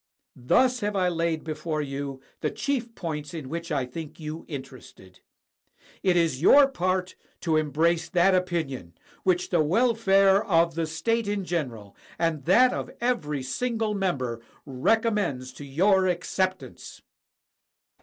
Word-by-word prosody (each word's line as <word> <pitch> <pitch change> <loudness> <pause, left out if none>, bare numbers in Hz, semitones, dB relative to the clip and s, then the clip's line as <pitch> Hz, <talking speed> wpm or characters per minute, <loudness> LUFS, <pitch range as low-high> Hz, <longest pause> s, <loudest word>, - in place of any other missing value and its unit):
Thus 250 - +2
have 210 -2 -2
I 185 -2 +2
laid 165 -2 -1
before 155 0 -3
you 140 -1 -5 0.2
the - - -1
chief 245 -5 -3
points 150 -2 -5
in 145 -5 -6
which 170 +2 -5
I 140 -4 0
think 150 +6 -8
you 155 +1 -6
interested. 130 - -10 0.8
It 185 -2 +2
is 160 -6 +1
your 285 - +7
part 185 -5 -1 0.3
to 160 -3 +1
embrace 160 +3 +1
that 185 +1 +3
opinion 160 - -2 0.3
which 180 -1 0
the 175 -3 +3
welfare 195 +1 +3
of 170 -5 +2
the 165 0 -2
state 230 +8 -1
in 205 -2 -2
general, 125 - -4 0.2
and 165 -4 -1
that 250 +9 +5
of - - -4
every 155 - -1
single 225 - -1
member, 135 - -2 0.2
recommends 140 - 0
to 145 - -10
your 185 +7 +3
acceptance. 185 +1 -3
170 Hz, 135 wpm, -26 LUFS, 145-195 Hz, 0.8 s, your